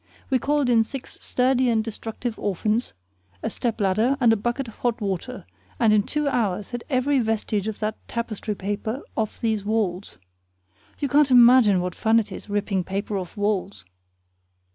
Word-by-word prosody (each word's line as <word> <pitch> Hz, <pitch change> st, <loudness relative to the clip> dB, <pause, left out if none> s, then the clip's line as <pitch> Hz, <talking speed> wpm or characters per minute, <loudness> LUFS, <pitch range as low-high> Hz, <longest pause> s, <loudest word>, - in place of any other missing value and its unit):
We 260 Hz, -, +3 dB
called 290 Hz, +1 st, +1 dB
in 235 Hz, -2 st, +5 dB
six 255 Hz, +4 st, -6 dB
sturdy 255 Hz, 0 st, +2 dB
and 225 Hz, -2 st, +2 dB
destructive 225 Hz, +1 st, -5 dB
orphans, 210 Hz, -, -1 dB, 0.5 s
a -, -, -2 dB
step 235 Hz, -2 st, -2 dB
ladder, 215 Hz, +7 st, +2 dB
and 235 Hz, -3 st, +5 dB
a -, -, +3 dB
bucket 240 Hz, +5 st, -2 dB
of 225 Hz, -, -12 dB
hot 240 Hz, -1 st, -1 dB
water, 205 Hz, +4 st, -4 dB, 0.3 s
and 225 Hz, -3 st, +4 dB
in 210 Hz, -, +5 dB
two 300 Hz, +7 st, -2 dB
hours 210 Hz, -6 st, -1 dB
had 240 Hz, -1 st, -4 dB
every 270 Hz, +1 st, +2 dB
vestige 220 Hz, -3 st, -1 dB
of 220 Hz, -, -3 dB
that 215 Hz, 0 st, -2 dB
tapestry 220 Hz, -2 st, -3 dB
paper 205 Hz, +6 st, -3 dB
off 220 Hz, -2 st, -2 dB
those 220 Hz, -3 st, 0 dB
walls. 200 Hz, -, -2 dB, 0.8 s
You 285 Hz, -, -1 dB
can't 285 Hz, +1 st, +4 dB
imagine 240 Hz, -6 st, +6 dB
what 180 Hz, 0 st, -3 dB
fun 220 Hz, +4 st, +2 dB
it 210 Hz, -2 st, -4 dB
is 200 Hz, -, -9 dB
ripping 200 Hz, -2 st, 0 dB
paper 200 Hz, +3 st, -3 dB
off 185 Hz, +1 st, -5 dB
walls. 200 Hz, -, -1 dB
220 Hz, 170 wpm, -24 LUFS, 205-245 Hz, 0.8 s, imagine